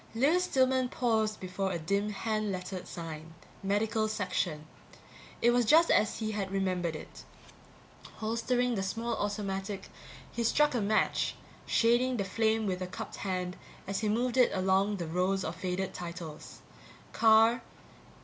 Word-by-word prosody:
Lewis 310 +10 +3
Stillman 260 -3 +2
paused 220 -4 0
before 190 +1 -2
a 175 - -1
dim 200 +6 0
hand 215 0 -1
lettered 185 0 -5
sign: 165 -1 -7 0.3
MEDICAL 215 +2 +1
SECTION. 180 -7 -2 0.8
It 240 - +6
was 245 0 +3
just 320 +8 +5
as 210 0 +3
he 220 -1 -2
had 200 -2 -2
remembered 185 -4 -1
it. 155 - -10 0.9
Holstering 240 +3 0
the 200 - -1
small 230 +5 -2
automatic, 200 -1 -3 0.4
he 235 - -2
struck 295 +6 +3
a 240 - 0
match, 215 +2 +1 0.3
shading 240 +2 +3
the 200 - 0
flame 220 +2 +1
with 185 -2 -2
a 185 - -2
cupped 180 - -7
hand 180 -2 -3 0.3
as 195 0 -2
he 215 - 0
moved 245 +4 0
it 250 - +6
along 190 +2 +2
the 175 - -3
rows 180 +4 0
of 160 - -3
faded 185 +1 -3
titles. 170 -3 -8 0.5
Carter 225 +2 +5
205 Hz, 150 wpm, -30 LUFS, 185-230 Hz, 0.9 s, It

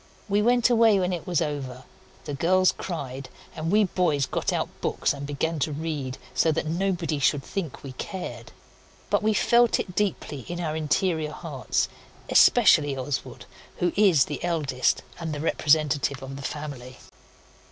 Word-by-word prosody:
We 205 0 +2
went 240 +1 +3
away 225 -4 +5
when 180 0 0
it 170 - -5
was 175 -2 +1
over. 135 -4 -5 0.4
The 145 - -4
girls 185 +6 +3
cried, 135 -6 -6 0.3
and 160 0 -3
we 210 +1 +5
boys 165 -7 +1
got - - -2
out - - -1
books - - 0
and 140 0 -6
began 155 +3 -2
to 150 - 0
read, 145 -4 -4 0.2
so 160 - +3
that 160 - -2
nobody 170 -2 -1
should 140 0 +2
think 170 -6 -5
we 135 - -7
cared. 120 - -7 0.6
But - - +3
we 215 0 +1
felt 235 +3 +4
it 180 - -4
deeply 190 -8 -1
in 175 0 -5
our 160 -3 -2
interior 160 0 0
hearts, - - -2 0.4
especially 150 - +5
Oswald, 130 +1 -4 0.3
who 175 -1 0
is 190 -9 +5
the 145 - -6
eldest 150 -7 0 0.2
and 160 -2 -4
the - - -5
representative 145 -3 +1
of 135 +1 -7
the 140 - -8
family. 135 -3 -6
155 Hz, 165 wpm, -25 LUFS, 140-185 Hz, 0.6 s, away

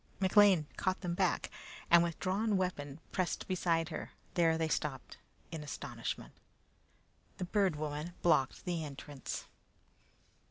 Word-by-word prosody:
McLean 190 -3 +6
caught 185 -1 0
them 175 -3 -1
back, 180 0 +1 0.4
and 170 0 +9
with 170 -1 -1
drawn 200 +2 +1
weapon, 150 -6 -2
pressed 185 -2 -1
beside 170 -3 +1
her. - - -6 0.2
There 165 -2 +4
they 160 0 +1
stopped 145 -4 -2 0.3
in 160 -2 -4
astonishment. 145 - -5 1.0
The 180 - -2
Bird 190 -2 +2
Woman 150 +3 -3
blocked 140 -6 +3
the 170 -2 -1
entrance. 145 -1 -6
170 Hz, 125 wpm, -34 LUFS, 150-185 Hz, 1.0 s, and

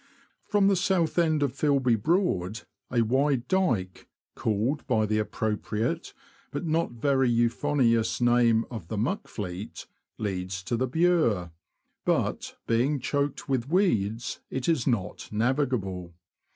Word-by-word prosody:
From 205 -2 +3
the 200 - +4
south 180 -3 +1
end 160 -3 +2
of 135 -3 0
Filby 140 -3 +2
Broad 110 - 0 0.3
a 120 -2 +2
wide 130 +2 +1
dyke, 120 - 0 0.3
called 115 +8 -1
by 110 -5 +2
the 110 0 0
appropriate, 110 +1 -2 0.3
but - - -4
not 160 -3 0
very 135 +1 +2
euphonious, 120 0 +2
name 120 -2 +4
of 110 -9 -7
the 110 - -4
Muck 125 - -1
Fleet, 95 0 -6 0.3
leads 95 -2 -3
to 120 - -1
the 130 +3 0
Bure, 135 - +2 0.5
but, - - -1
being 130 +6 +1
choked 140 +2 -1
w^ith 130 -3 -2
weeds, 115 - +1
it 130 -1 -3
is 160 -7 +1
not 105 -9 -2
navigable. 105 - -1
120 Hz, 130 wpm, -27 LUFS, 110-145 Hz, 0.5 s, the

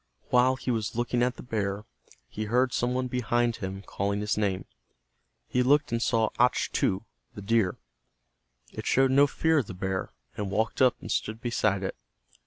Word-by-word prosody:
While 125 +1 +4
he 130 0 -3
was 110 -3 -2
looking 120 0 0
at 125 +1 +1
the - - -10
bear, 105 -3 -2 0.4
he 110 - -5
heard 125 +3 +2
some 125 +1 0
one 130 0 0
behind, 120 -2 0
him 95 +1 -5
calling 100 +1 -2
his 105 0 0
name. 100 -3 -1 0.8
He 125 - +1
looked 145 +3 +3
and 115 0 0
saw 115 -3 +2
Achtu, 115 -5 +2 0.3
the 100 - -7
deer. 110 -3 +1 1.0
It - - -6
showed 135 0 +4
no 140 +2 +6
fear 160 +2 +2
of 125 - -3
the 95 - -7
bear, 95 +1 -3 0.2
and 105 -2 -3
walked 110 +6 -1
up 130 -2 +5
and - - -6
stood 110 +1 -1
beside 105 -5 0
it. 95 - -3
115 Hz, 180 wpm, -28 LUFS, 100-125 Hz, 1.0 s, no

